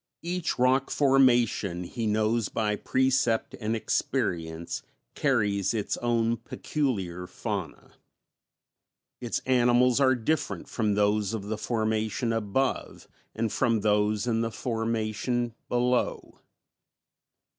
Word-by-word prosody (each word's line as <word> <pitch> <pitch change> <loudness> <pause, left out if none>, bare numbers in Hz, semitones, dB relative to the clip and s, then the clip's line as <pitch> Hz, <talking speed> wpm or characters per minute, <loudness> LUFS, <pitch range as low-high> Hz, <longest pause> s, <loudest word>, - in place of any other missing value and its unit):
Each 175 0 -2
rock 130 +2 +3
formation, 120 -9 +3
he 115 +5 -4
knows 110 +1 +1
by 105 -2 0
precept 130 -1 +1
and 110 0 -1
experience, 85 -6 -2 0.3
carries 105 -7 +1
its 105 - -1
own 115 -1 +1
peculiar 95 - -3
fauna, - - -5 1.3
its 120 -2 -3
animals 125 0 +4
are 130 -1 +4
different 140 +5 -2
from 105 -3 0
those 105 +1 +1
of 105 - -5
the 105 +2 -3
formation 110 0 -1
above 115 +5 -2 0.3
and 115 -1 -1
from 115 -3 +1
those 105 +1 +2
in 115 -2 +1
the 115 - 0
formation 115 +1 -2 0.2
below. 125 0 0
115 Hz, 105 wpm, -27 LUFS, 105-125 Hz, 1.3 s, animals